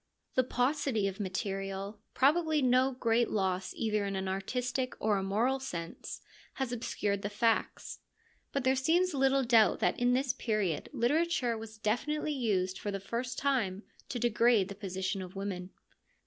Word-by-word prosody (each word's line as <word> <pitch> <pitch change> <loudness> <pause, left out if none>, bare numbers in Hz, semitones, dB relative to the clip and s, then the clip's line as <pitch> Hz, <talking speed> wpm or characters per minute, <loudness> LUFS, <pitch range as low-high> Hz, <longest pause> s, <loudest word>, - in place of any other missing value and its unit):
The 255 - +3
paucity 250 -4 +1
of 195 +1 -5
material, 195 +1 -3 0.2
probably 310 +3 +3
no 255 0 +4
great 235 -1 +2
loss 190 -2 -1
either 215 -2 0
in 200 -1 -2
an 190 0 -2
artistic 250 +7 -2
or 210 -1 +2
a - - -3
moral 230 +8 +1
sense, 170 -11 -6 0.3
has 265 -3 -2
obscured 205 -4 -2
the 205 - -2
facts, 225 +2 0 0.5
but 275 - -1
there 260 +1 +3
seems 335 +7 +2
little 270 0 +3
doubt 225 -5 +5
that 180 - +1
in 245 0 +3
this 260 -1 +1
period 215 - -1
literature 265 -1 +1
was 220 0 -8
definitely 295 +8 -1
used 190 -8 0
for 205 - -4
the 195 -1 -2
first 240 +5 -4
time 230 -8 0 0.3
to 250 - -3
degrade 235 -3 +3
the - - -5
position 190 -1 -3
of 185 0 -8
women. 190 -2 -4
225 Hz, 160 wpm, -31 LUFS, 195-260 Hz, 0.5 s, doubt